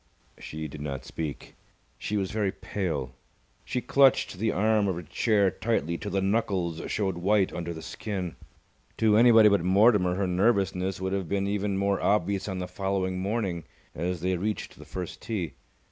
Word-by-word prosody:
She 80 0 -6
did 75 0 -9
not 70 -2 -5
speak. 80 -3 -6 0.5
She 105 - -2
was 95 -2 -1
very 105 -2 0
pale. 80 -13 -3 0.5
She 125 - -2
clutched 135 +1 +4
the 110 +1 +1
arm 105 +1 +2
of 95 - 0
her 85 - -6
chair 100 +4 +2
tightly 95 -5 -1
till 105 - -5
the 100 -1 0
knuckles 95 -6 0
showed 95 -4 -1
white 100 +1 +2
under 85 -1 -4
the 80 -1 -7
skin. 95 -5 -4 0.6
To 110 -2 +4
anybody 115 -1 +7
but 100 -3 +4
Mortimer 95 -1 +4
her 100 +1 0
nervousness 95 -1 +1
would 95 0 -2
have 95 -4 -2
been 100 0 0
even 100 0 -1
more 100 0 +1
obvious 100 -1 +1
on 95 -2 -3
the 90 0 -3
following 95 0 -2
morning, 95 -4 -2 0.3
as 85 +1 -3
they 95 +1 +1
reached 105 +4 -4
the - - -11
first 90 -2 -6
tee. 95 -8 -3
95 Hz, 175 wpm, -27 LUFS, 90-105 Hz, 0.6 s, anybody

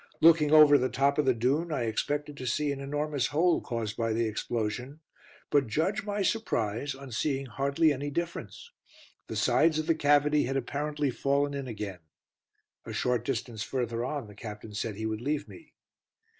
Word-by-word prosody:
Looking 160 -2 +6
over 150 -2 +8
the 130 +1 0
top 140 +2 +1
of 150 - +3
the 130 - +4
dune, 140 +9 0
I 140 -5 -1
expected 145 +6 -2
to 130 - -5
see 145 +5 0
an 140 - -4
enormous 145 0 -1
hole, 165 +4 +2
caused 115 -3 -3
by 115 -1 0
the 115 +1 +1
explosion, 115 +5 -3 0.5
but 145 -3 +3
judge 160 - 0
my 205 -1 -1
surprise 135 - -1
on 135 -1 -10
seeing 135 +4 -1
hardly 140 +5 +1
any 145 +2 -4
difference. 170 - -5 0.6
The - - -5
sides 160 -1 +3
of 155 - -1
the 165 - +3
cavity 145 -1 +3
had 135 +2 -1
apparently 145 +2 -2
fallen 140 +3 0
in 140 -2 -4
again. 105 -5 -5 0.8
A - - -7
short 125 -2 0
distance 120 -3 -3
further 120 -1 -2
on 140 0 -3
the 105 - -13
Captain 105 0 -9
said 105 +1 -3
he 110 +2 -4
would 110 0 -3
leave 145 +3 -2
me. 325 -3 -14
140 Hz, 180 wpm, -29 LUFS, 115-150 Hz, 0.8 s, over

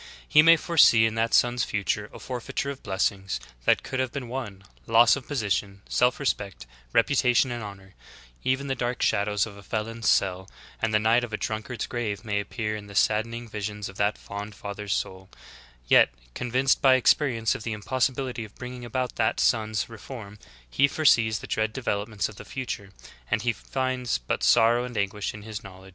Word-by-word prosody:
He 150 - +7
may 165 +1 +7
foresee 145 -10 +5
in 110 - 0
that 115 0 0
son's 120 0 +3
future 105 0 -2
a - - -10
forfeiture 130 +2 -4
of 135 - -9
blessings 95 - -1 0.3
that - - +3
could 130 - -4
have 130 -2 0
been 125 -3 -6
won, 110 -7 -6 0.2
loss 115 +1 +6
of 140 -3 -8
position, 100 -6 -2
self 125 +3 +2
respect 100 - -2 0.3
reputa 125 - +3
tion 130 +1 +3
and 120 -1 -4
honor; 95 -2 -10 0.5
even 130 +2 0
the 135 - -1
dark 125 -1 -2
shadows 105 0 +1
of 105 -3 -10
a - - -11
felon's 110 +3 -2
cell 95 -1 +1 0.3
and 115 - +1
the 105 - +4
night 115 +3 +3
of 115 -3 -6
a - - 0
drunkard's 110 +2 -4
grave 110 -3 -4
may 105 -1 0
appear 110 +1 -3
in 105 -1 -8
the 100 - -11
sadden 110 +3 +2
ing 120 0 -7
visions 105 -1 -5
of 95 - -12
that 105 +1 +1
fond 105 +1 -7
father's 100 0 -6
soul; 95 0 -3 0.6
yet, - - +6 0.2
convinced 130 - +1
by 130 -1 +6
ex 130 - +6
perience 115 -7 -1
of - - -6
the 115 - -4
impossibility 125 +2 -1
of 105 - -12
bringing 125 0 -8
about 125 +1 -3
that 110 -1 +1
son's 110 -3 +1
reform, 110 -2 -10 0.3
he 140 - +3
foresees 115 -7 +3
the - - -8
dread 110 0 0
developments 105 -4 -2
of 105 - -12
the - - -9
future, 120 -6 -5 0.4
and 110 - 0
he 120 -1 +1
finds 130 - -2
but - - -3
sorrow 120 +1 +4
and 125 -2 -6
anguish 100 +1 -2
in 105 - -10
his 110 -1 -7
knowledge. 95 -1 -12
110 Hz, 195 wpm, -26 LUFS, 100-125 Hz, 0.6 s, He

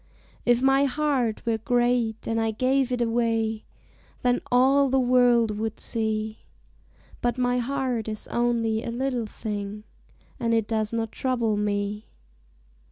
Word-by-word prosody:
If 240 +1 +4
my 270 +1 +4
heart 270 -5 0
were 225 -1 0
great 240 -1 0
and 225 0 0
I 225 - +1
gave 255 +3 +1
it 245 -1 -1
away 225 -2 0 0.6
Then 245 0 +2
all 270 +3 +4
the 265 +1 +3
world 245 -4 +3
would 220 0 -3
see. 220 -1 -2 0.8
But 240 +1 0
my 250 0 +1
heart 250 -3 -2
is 215 -1 -4
only 230 -2 0
a - - -4
little 245 -1 -2
thing 210 -1 -5 0.6
And 230 -1 +1
it 225 -2 +1
does 220 -2 -1
not 225 -1 -2
trouble 240 -5 0
me. 205 0 -2
235 Hz, 140 wpm, -25 LUFS, 220-250 Hz, 0.8 s, If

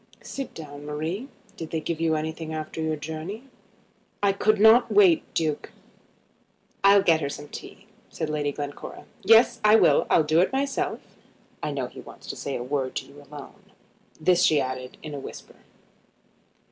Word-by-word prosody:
Sit 275 -2 -6
down, 145 -2 -9
Marie. 160 - -4 0.3
Did 165 -6 -7
they 160 - -2
give 165 +1 -4
you 160 -1 +2
anything 160 +1 -4
after 155 +1 -5
your 160 0 0
journey?" 160 - -6 0.8
"I 200 -1 +4
could 215 +1 +2
not 220 +3 +6
wait, 365 -6 +4
Duke." 155 -3 -1 1.1
"I'll 200 0 +6
get 165 -4 +4
her 140 - -2
some 145 +1 -7
tea," 195 - -10 0.2
said 160 - -4
Lady 150 -1 -1
Glencora. 145 0 -7 0.2
"Yes, 230 +1 +5
I 215 +1 +7
will. - - +4
I'll 160 - +5
do 155 +3 +3
it 185 - +1
myself. 280 +8 -1 0.6
I - - -2
know - - -2
he - - -10
wants - - -14
to - - -9
say 140 - -4
a 120 - -3
word 130 0 -2
to - - -3
you 145 +1 -15
alone." 145 0 -12 0.6
This 180 +2 +3
she 155 -4 +4
added 130 -1 -4
in 155 -2 -7
a 145 - -5
whisper. - - -10
160 Hz, 170 wpm, -25 LUFS, 150-200 Hz, 1.1 s, I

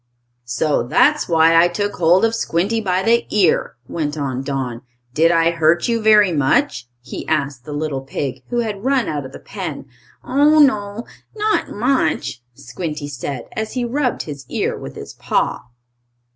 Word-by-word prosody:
"So 140 +5 0
that's 290 - +2
why 165 0 +5
I 165 +1 +6
took 205 +3 -3
hold 180 +4 +4
of 225 - 0
Squinty 225 +1 0
by 185 -2 0
the 235 +3 +2
ear," 195 -6 +2
went 155 -2 -3
on 135 -3 -2
Don. 135 -4 -4 0.3
"Did 160 +4 +4
I 165 0 +3
hurt 165 +1 +2
you 230 -1 0
very 210 -4 +5
much?" 145 - +1 0.2
he 125 - -7
asked 140 -5 -1
the 150 - -8
little 145 -2 -3
pig 135 0 -4
who 240 -1 0
had 210 -3 -4
run 265 -1 +1
out 145 -3 -3
of - - -15
the - - -9
pen. 180 -9 -6 0.4
"Oh, 290 +4 +3
no; 215 -6 +2 0.3
not 430 0 0
much," 215 - 0
Squinty 145 +3 -6
said, 135 -2 -5
as 220 0 -4
he 250 -2 -1
rubbed 250 +1 -1
his 145 -3 -8
ear - - -1
with 65 - -9
his - - -9
paw. - - -1
170 Hz, 170 wpm, -19 LUFS, 145-225 Hz, 0.4 s, I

